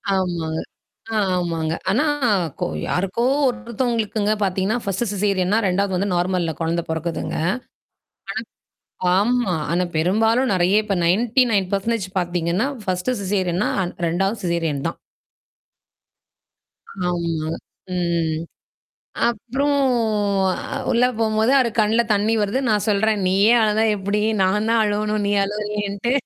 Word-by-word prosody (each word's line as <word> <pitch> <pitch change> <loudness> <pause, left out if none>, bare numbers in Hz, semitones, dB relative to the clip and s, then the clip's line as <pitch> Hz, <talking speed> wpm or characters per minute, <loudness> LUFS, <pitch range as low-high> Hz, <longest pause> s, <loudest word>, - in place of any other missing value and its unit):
ஆமாங்க. 170 -4 -1 0.6
ஆமாங்க. 170 -4 -1 0.2
ஆனா 230 +11 +2 0.5
கோ - - 0 0.2
யாருக்கோ 195 +6 0 0.2
ஒருத்தவுங்களுக்குங்க 235 -3 -1
பார்த்தீங்கன்னா, 195 +3 0
ஃபர்ஸ்ட்ட் 200 +3 -2
சிசேரியன்னா 200 0 +1
2வது 190 +1 0
வந்து 195 +3 0
நார்மல்ல 175 -2 0
குழந்த 165 +1 0
பொறக்குதுங்க. 160 +1 -3 1.7
அ. - - +4
ஆமா. 235 -2 +1 0.2
ஆனா 180 +1 +2
பெரும்பாலும் 225 +10 +2
நெறைய 185 +4 +3
இப்ப 200 -2 -1
நயன்ட்டி 230 +8 +3
நயன் 195 -3 +1
பெர்சன்டேஜ் 200 0 -1
பார்த்தீங்கன்னா, 175 +5 0 0.2
பர்ஸ்டு 185 +7 -1
சிசேரியன்னா 190 -1 0
அ - - -1 0.2
2வது 195 +6 -1
சிசேரியன் 165 -5 -1
தான். - - -6 2.1
ஆமா. 165 -3 -2 0.4
ம். 170 -3 0 0.9
அப்புறம் 255 +5 -1 0.8
அ - - -5 0.2
உள்ள 245 0 +4
போம்போது 220 +1 +2
அவரு 255 -3 +3
கண்ல 220 +2 +3
தண்ணீ 210 +2 +1
வருது. 205 +5 0
நான் 210 -2 +1
சொல்றேன். 210 0 +1
நீயே 200 +5 +4
அழதா 215 0 +2
எப்பிடி 200 +1 -1 0.2
நான் 210 +3 +2
தான் 230 -1 +3
அழுவணும், 210 0 0
நீ - - +1
அழுவுறியேன்ட்டு. 210 +1 -2
200 Hz, 115 wpm, -21 LUFS, 180-220 Hz, 2.1 s, அ